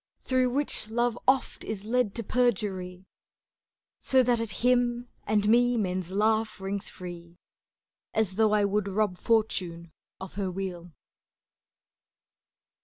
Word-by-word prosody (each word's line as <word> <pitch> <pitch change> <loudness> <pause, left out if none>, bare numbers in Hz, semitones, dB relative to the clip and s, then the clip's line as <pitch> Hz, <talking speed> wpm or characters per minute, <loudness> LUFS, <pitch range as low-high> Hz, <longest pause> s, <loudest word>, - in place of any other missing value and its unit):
Through 255 -1 +1
which 270 -4 0
Love 240 +1 +1
oft 265 0 +2
is 210 -2 -5
led 235 -2 0
to 230 - -3
perjury; 190 -6 -1 0.9
So 260 -1 +3
that 240 -1 +2
at 230 -1 -3 0.2
him 245 -1 +2 0.2
and 210 0 +2
me 245 +2 +4
men's 185 -4 -1
laugh 215 +2 +1
rings 195 +1 -3
free, 175 -1 -10 0.7
As 215 -4 0
though 220 0 +3
I 210 -1 +3
would 200 0 0
rob 200 -1 0
Fortune 180 -7 0 0.3
of 190 - -8
her 200 -2 -2
wheel. 180 -2 -5
210 Hz, 125 wpm, -28 LUFS, 190-240 Hz, 0.9 s, me